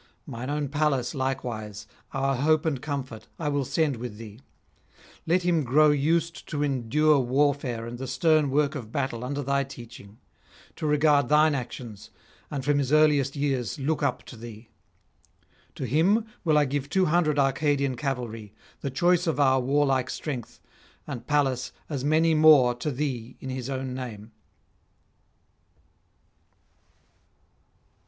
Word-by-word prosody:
Mine 120 +3 -6
own 145 0 -1
Pallas 145 -3 0
likewise, 120 -6 -4 0.3
our 135 0 0
hope 155 +4 +2
and 140 -6 -1
comfort, 135 -6 -5
I 150 -3 -2
will 145 -1 0
send 145 0 0
with 120 -3 -7
thee; 110 -1 -10 0.9
let 175 +2 +2
him 170 -3 +2
grow 150 +4 +4
used 165 +4 0
to 150 -2 -1
endure 145 +3 +2
warfare 130 -2 0
and 120 +1 -7
the 130 - -5
stern 155 0 +2
work 145 +1 +1
of 120 -8 -7
battle 130 -4 -2
under 140 +3 -3
thy 140 +1 +1
teaching, 120 -6 -12 0.6
to 155 - -2
regard 150 -3 +3
thine 150 +1 +5
actions, 120 -5 -6 0.4
and 140 -3 -4
from 145 0 +2
his 135 -1 -1
earliest 150 -3 +3
years 135 -4 -1
look 145 +3 -1
up 140 -4 -1
to - - -11
thee. 115 0 -11 1.1
To - - -5
him 170 - +2 0.2
will 155 -3 +3
I 150 - +4
give 140 0 -3
two 185 +3 +2
hundred 155 -2 +2
Arcadian 140 -1 +1
cavalry, 120 -5 -4 0.2
the 140 - -3
choice 175 +6 +2
of 160 -2 0
our 130 -2 +4
warlike 135 -1 +1
strength, 130 -7 -5 0.5
and 120 0 -7
Pallas 135 -4 +1 0.2
as 140 -4 -3
many 160 +3 +3
more 155 -5 +6
to 120 +5 -4
thee 125 -4 -4
in 130 - -6
his 130 0 -5
own 130 -1 -3
name.' 115 -4 -7
140 Hz, 145 wpm, -26 LUFS, 125-150 Hz, 1.1 s, more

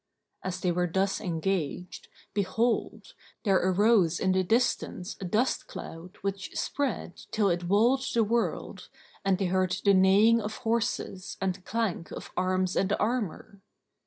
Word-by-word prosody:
As 185 -1 -3
they 180 -2 +1
were 180 0 0
thus 195 +2 0
engaged, 180 -2 -2 0.3
behold, 210 +4 -1 0.3
there 195 -3 +4
arose 185 -2 +3
in 190 - +2
the 185 0 +3
distance 220 -3 0
a - - -3
dust 220 +8 0
cloud 175 +4 -9
which 195 -1 -4
spread 260 -11 -2
till 205 -4 +2
it 175 0 -1
walled 235 +8 +3
the 230 - +3
world, 230 +2 -2 0.3
and 195 -1 +2
they 195 - -1
heard 185 0 +1
the 200 - +6
neighing 200 +5 +5
of 215 +1 -5
horses 225 -4 -1
and 190 -1 -2
clank 220 -7 -2
of - - -8
arms 185 0 0
and 195 +1 +1
armour. 210 -3 -2
195 Hz, 145 wpm, -28 LUFS, 185-220 Hz, 0.3 s, the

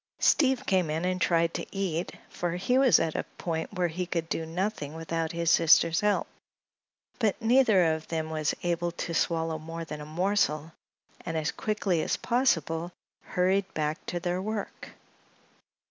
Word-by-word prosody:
Steve 265 -3 +3
came 185 -8 +2
in 160 +3 -1
and 185 0 -1
tried 165 -1 +2
to - - -3
eat, 180 -3 -2
for 175 -1 -3
he 190 +8 0
was 265 -2 +6
at 160 -1 0
a - - -1
point 165 -2 -3
where 180 -3 0
he 180 +2 -4
could 170 -2 -2
do 160 - -2
nothing 170 -3 -3
without 165 0 -2
his 170 -1 +1
sister's 165 0 +5
help; 210 -1 +2 0.9
but 220 -5 +1
neither 225 -8 +4
of 160 0 -6
them 160 -1 -3
was 155 -1 0
able 175 0 0
to 170 0 -5
swallow 165 -1 0
more 165 +1 -6
than 150 -1 -7
a - - -7
morsel, 160 -2 0 0.5
and 165 -2 -3
as 155 0 -1
quickly 205 -6 -1
as - - -1
possible 175 - 0 0.3
hurried 190 +2 0
back 155 +1 -2
to 175 - -2
their 175 +1 -2
work. 215 0 -5
170 Hz, 165 wpm, -28 LUFS, 160-190 Hz, 0.9 s, was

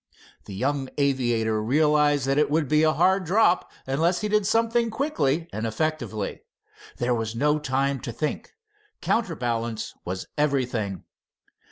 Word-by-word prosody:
The 100 - -8
young 135 +4 -1
aviator 120 -6 +1
realized 145 +3 +3
that 135 +2 +2
it 150 -2 +2
would 155 -1 +1
be 150 +3 +3
a 155 0 +4
hard 190 +4 +3
drop 185 +1 +2
unless 165 +7 +1
he 210 - -1
did 210 -1 +1
something 230 +1 +2
quickly 170 - 0
and 110 +1 -2
effectively. 115 -4 -3 0.6
There 120 0 0
was 115 -1 -2
no 150 +5 +2
time 135 -1 0
to 120 - -6
think. 145 +6 -4 0.5
Counterbalance 120 - -1
was 95 +1 -4
everything. 125 -9 0
140 Hz, 140 wpm, -25 LUFS, 120-160 Hz, 0.6 s, a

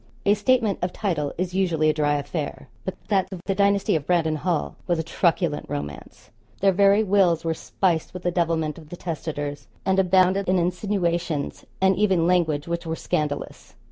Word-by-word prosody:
A 200 - +5
'statement 215 -1 +2
of 180 0 -1
title' 160 -9 -1
is 180 +1 -2
usually 170 -5 +1
a 155 - +4
dry 145 -1 +1
affair. 145 0 -4 0.2
But 190 - -3
that 195 -3 +2
of 190 - -6
the 195 - 0
dynasty 200 -1 +2
of 150 -2 -2
Brandon 165 -3 +2
Hall 170 0 -1
was 175 -2 +1
a 160 - -1
truculent 165 -1 0
romance. 75 0 -7 0.3
Their 195 0 +4
very 200 +3 +4
'wills' 185 -5 +3
were 165 - +1
spiced 165 0 -1
with 180 -1 -8
the 175 - +1
devilment 165 -3 0
of 155 -2 -15
the 175 - -8
'testators,' 145 -4 -5 0.2
and 190 0 +2
abounded 185 +1 +3
in 185 - +3
insinuations 175 -4 -1
and 190 0 +4
even 190 -5 +3
language 165 -4 +1
which 170 0 -3
were 160 - -1
scandalous. 150 -2 -3
175 Hz, 180 wpm, -24 LUFS, 155-190 Hz, 0.3 s, A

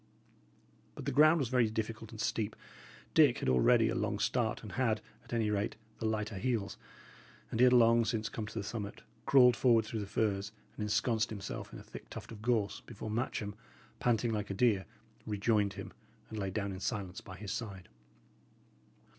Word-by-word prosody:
But - - -7
the 140 - 0
ground 155 +4 +6
was 135 -7 0
very 125 -3 +3
difficult 110 0 -4
and 110 - -10
steep; 105 0 -1 0.6
Dick - - +6
had - - -3
already 65 -1 +5
a - - 0
long - - -1
start, 115 -4 0
and 105 - -7
had, 115 0 +1 0.2
at - - -17
any 115 -3 +1
rate, 105 +1 -1 0.2
the 110 - -1
lighter 105 -2 -2
heels, 115 -4 -1 0.8
and 115 - -2
he 125 - +8
had 125 - +6
long 115 -1 +6
since 110 -1 -1
come 110 -2 -5
to 110 - -8
the 105 - -1
summit, 100 -1 -5 0.2
crawled 125 -3 +7
forward 115 -2 +4
through 110 0 -4
the 100 - -4
firs, 100 0 -1 0.2
and - - -7
ensconced 110 +1 +1
himself 100 -3 -6
in - - -8
a - - -10
thick - - -11
tuft - - -8
of 110 -2 -9
gorse, 110 -4 0
before 110 -2 -6
Matcham, 110 -2 -2 0.5
panting 120 -1 +1
like 105 -1 -2
a 100 - -3
deer, 100 -4 +2 0.4
rejoined 105 -1 +1
him, - - -8 0.4
and 110 - -4
lay 95 -1 -1
down 100 +1 -2
in 95 - -6
silence 95 -4 -3
by 95 -1 -10
his 105 -2 -6
side. 95 -6 -5
110 Hz, 190 wpm, -33 LUFS, 100-115 Hz, 0.8 s, he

